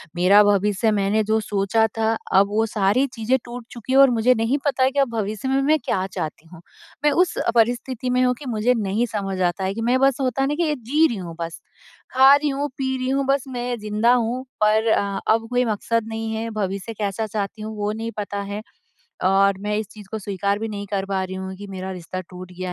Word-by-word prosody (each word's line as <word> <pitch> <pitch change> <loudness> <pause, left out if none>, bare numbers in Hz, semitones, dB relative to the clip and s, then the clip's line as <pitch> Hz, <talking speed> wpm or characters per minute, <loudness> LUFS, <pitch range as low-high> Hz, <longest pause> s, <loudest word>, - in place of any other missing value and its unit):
मेरा 190 +4 +6
भविष्य 205 +1 +2
मैंने 205 +1 +1
जो 220 +1 +1
सोचा 210 +1 +1
था 225 0 +2 0.2
अब 195 +1 +5
वो 220 +2 +1
सारी 210 +4 +2
चीज़ें 235 +2 +1
टूट 240 0 -8
चुकी 240 +2 -5
है - - +5
और 275 -1 +8
मुझे 240 +1 +3
नहीं 225 +5 +1
पता 265 -2 +2
कि 280 +1 -2
अब 275 -2 +3
भविष्य 215 +2 -3
में 270 +1 +2
मैं 305 +3 +3
क्या 190 0 0
चाहती 160 -3 -6
हूँ? 165 0 -14 0.4
मैं 295 - +4
उस 355 +4 +2 0.2
परिस्थिति 245 +2 +1
में 250 0 +2
हूँ 250 - +3
कि 290 - -10
मुझे 230 +2 +2
नहीं 210 +2 0
समझ 195 -3 -3
आता 180 +2 0
है 190 +1 -1
कि 225 - -5
मैं 245 +3 +2
बस 270 -1 +3
होता 260 0 0
है 270 - +2
ना 295 - -1
कि 335 0 0
एक 290 -4 -4
जी 295 +8 +3
रही 235 - -4
हूँ 170 -3 -7
बस 165 0 -5 0.5
खा 265 +2 +8
रही 290 +1 0
हूँ 280 +1 -1
पी 265 -1 -1
रही 255 0 -2
हूँ 275 +1 +1
बस 275 -1 +1
मैं 245 -1 -3
ज़िंदा 215 +3 +2
हूँ 245 +1 0 0.2
पर 215 +1 +3
अ 200 -2 0
अब 225 0 -1
कोई 250 0 +1
मकसद 225 +1 -1
नहीं 225 0 -4
है, 225 +1 -3
भविष्य 200 -1 -3
कैसा 210 0 -2
चाहती 210 +1 -4
हूँ 215 0 -6
वो 205 0 -1
नहीं 225 +1 -4
पता 205 -1 -3
है। 205 +1 -4 0.6
और 195 +1 +3
मैं 210 +1 -2
इस 215 0 -2
चीज़ 210 -2 -13
को 220 - -3
स्वीकार 200 0 -1
भी 225 - -3
नहीं 205 -1 -5
कर 195 -1 -2
पा 195 -1 -1
रही 185 0 -6
हूँ 190 0 -5
कि 205 +2 -9
मेरा 190 -1 -6
रिश्ता 185 0 -6
टूट 180 0 -10
गया 180 0 -5
220 Hz, 240 wpm, -22 LUFS, 200-250 Hz, 0.6 s, और